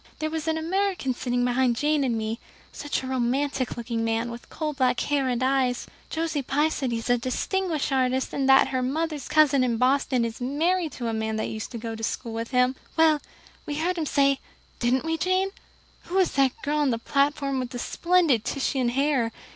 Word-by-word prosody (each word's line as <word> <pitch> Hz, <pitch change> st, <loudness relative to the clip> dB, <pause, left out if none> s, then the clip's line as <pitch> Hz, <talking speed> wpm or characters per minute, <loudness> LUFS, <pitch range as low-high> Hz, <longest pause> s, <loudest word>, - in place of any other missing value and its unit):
There 310 Hz, 0 st, -2 dB
was 320 Hz, 0 st, -3 dB
an 320 Hz, 0 st, +1 dB
American 360 Hz, -4 st, 0 dB
sitting 245 Hz, 0 st, -1 dB
behind 250 Hz, 0 st, +2 dB
Jane 295 Hz, +3 st, +1 dB
and 240 Hz, -4 st, 0 dB
me 220 Hz, +1 st, -3 dB, 0.3 s
such 290 Hz, -2 st, -3 dB
a -, -, -5 dB
romantic 260 Hz, +1 st, -1 dB
looking 230 Hz, -1 st, -2 dB
man, 225 Hz, +1 st, -1 dB
with 235 Hz, 0 st, -10 dB
coal 305 Hz, -2 st, -3 dB
black 255 Hz, -3 st, +1 dB
hair 285 Hz, -2 st, +1 dB
and 250 Hz, 0 st, 0 dB
eyes. 260 Hz, -2 st, +1 dB, 0.2 s
Josie 320 Hz, -2 st, -1 dB
Pye 290 Hz, +4 st, +1 dB
says 270 Hz, -4 st, -2 dB
he 235 Hz, -, -1 dB
is 230 Hz, -, -5 dB
a 245 Hz, -, +3 dB
distinguished 315 Hz, +6 st, -1 dB
artist, 260 Hz, 0 st, +1 dB
and 270 Hz, -1 st, 0 dB
that 270 Hz, 0 st, +6 dB
her 260 Hz, -1 st, -1 dB
mother's 300 Hz, +2 st, -2 dB
cousin 295 Hz, -4 st, +4 dB
in 240 Hz, -2 st, +1 dB
Boston 255 Hz, -1 st, +2 dB
is 230 Hz, +1 st, -6 dB
married 315 Hz, +5 st, 0 dB
to 240 Hz, -, -4 dB
a 225 Hz, -, -1 dB
man 220 Hz, 0 st, -2 dB
that 220 Hz, -, -2 dB
used 215 Hz, -1 st, -5 dB
to -, -, -4 dB
go 225 Hz, 0 st, -5 dB
to 225 Hz, -, -7 dB
school 225 Hz, +1 st, -3 dB
with 230 Hz, 0 st, -4 dB
him. 250 Hz, 0 st, +2 dB, 0.2 s
Well, 315 Hz, -2 st, +5 dB, 0.5 s
we 295 Hz, -, -2 dB
heard 340 Hz, +4 st, 0 dB
him 310 Hz, -, -1 dB
say 275 Hz, -1 st, +3 dB, 0.4 s
didn't 250 Hz, +4 st, +1 dB
we, 325 Hz, 0 st, 0 dB
Jane? 370 Hz, +3 st, +1 dB, 0.5 s
'Who 365 Hz, -, -2 dB
is 375 Hz, -2 st, +3 dB
that 270 Hz, -2 st, +1 dB
girl 300 Hz, +1 st, 0 dB
on 290 Hz, -2 st, +2 dB
the 230 Hz, -, +1 dB
platform 275 Hz, +2 st, 0 dB
with 250 Hz, -1 st, -3 dB
the 245 Hz, -, -6 dB
splendid 335 Hz, -4 st, +2 dB
Titian 265 Hz, -2 st, 0 dB
hair? 265 Hz, -2 st, +1 dB
265 Hz, 210 wpm, -26 LUFS, 245-300 Hz, 0.5 s, that